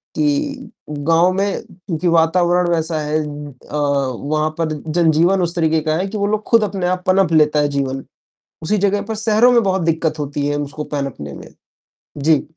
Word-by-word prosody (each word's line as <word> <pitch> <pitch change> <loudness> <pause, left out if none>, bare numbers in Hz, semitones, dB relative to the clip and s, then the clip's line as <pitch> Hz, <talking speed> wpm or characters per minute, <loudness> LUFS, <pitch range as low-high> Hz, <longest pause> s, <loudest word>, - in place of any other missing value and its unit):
कि 285 -3 -1 0.2
गाँव 165 +5 +2
में 200 +1 -1
क्योंकि 175 -1 -4
वातावरण 175 +2 +3
वैसा 160 -1 -1
है 150 +1 -1
अ, 145 -1 -8
वहाँ 145 +2 0
पर 160 -1 0 0.2
जनजीवन 170 +3 +3
उस 170 0 -2
तरीके 160 -1 +2
का 155 0 0
है 190 +2 -1
कि 210 - -5
वो 200 0 0
लोग 215 0 -1
खुद 230 -3 +4
अपने 195 -3 -2
आप 180 0 -1
पनप 185 -1 +3
लेता 150 -1 +4
है 145 - +2
जीवन 135 -1 -2 0.6
उसी 210 +6 +1
जगह 200 +1 +1
पर, 220 +2 -5
शहरों 220 +3 +3
में 235 -1 +5
बहुत 190 -1 0
दिक्कत 160 -1 0
होती 145 0 -2
है 145 0 -1
उसको 145 +1 -4
पनपने 120 - -4
में। - - -10 0.7
जी। 155 +1 +3
165 Hz, 180 wpm, -18 LUFS, 150-195 Hz, 0.7 s, में